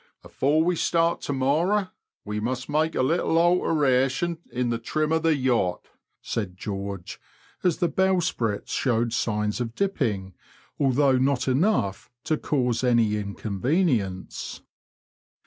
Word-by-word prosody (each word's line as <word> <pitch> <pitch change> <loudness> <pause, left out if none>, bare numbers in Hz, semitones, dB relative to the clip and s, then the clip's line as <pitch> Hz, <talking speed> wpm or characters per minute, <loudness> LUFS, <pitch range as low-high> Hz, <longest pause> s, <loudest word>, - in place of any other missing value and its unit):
Before 150 +4 +1
we 180 +1 +1
start 165 +1 +1
to 145 - -3
morrow 170 +10 +1 0.4
we 105 0 -3
must 125 +3 -3
make 155 +2 0
a - - +2
little 165 +3 +1
alteration 160 -2 +2
in 125 -1 -1
the 115 - -1
trim 155 +6 -1
of 160 0 +2
the 165 -1 +3
yacht," 125 -9 0 0.3
said 95 -5 -3
George, 100 -2 -6 0.4
as 180 -3 +2
the 175 - +1
bowsprit 175 - 0
showed 115 -3 0
signs 105 -1 -1
of 115 -1 -4
dipping, 110 - -1 0.5
although 135 -1 +3
not 130 -1 +1
enough 130 - +1
to 160 - +1
cause 125 -5 0
any 115 -4 +3
inconvenience. 105 - -2
130 Hz, 130 wpm, -25 LUFS, 110-160 Hz, 0.5 s, the